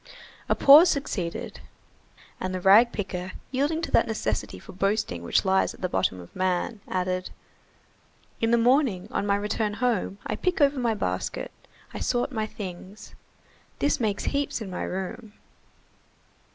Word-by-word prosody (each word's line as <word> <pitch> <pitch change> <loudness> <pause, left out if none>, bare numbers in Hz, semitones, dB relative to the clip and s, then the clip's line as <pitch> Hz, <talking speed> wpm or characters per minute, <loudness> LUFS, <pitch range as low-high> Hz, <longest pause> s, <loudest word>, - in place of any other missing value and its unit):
A - - +3
pause 300 +6 +8
succeeded, 195 - -3 0.8
and 185 0 -3
the - - -2
rag 205 +6 +6
picker, 185 -3 -5 0.2
yielding 290 +5 0
to - - -3
that - - +4
necessity 110 - -2
for - - -12
boasting 195 - -1
which 85 - +1
lies 190 0 +2
at - - -19
the 185 - 0
bottom 95 - 0
of 85 - -13
man, 185 +4 -1
added:— 185 0 -2 1.1
"In 225 - +2
the 235 - +4
morning, 235 -6 +2
on 205 - -1
my 200 - +3
return 210 +1 -1
home, 230 -5 -1
I 215 - -2
pick 365 +6 -1
over 280 -2 +3
my 235 -3 +1
basket, 90 - -3 0.4
I - - -5
sort 245 +3 0
my 220 -3 -2
things. 190 0 -9 0.6
This 285 0 +1
makes 210 -4 -1
heaps 280 -2 -1
in 210 -4 -7
my 180 - -4
room. 190 +4 -5
205 Hz, 155 wpm, -26 LUFS, 185-245 Hz, 1.1 s, pause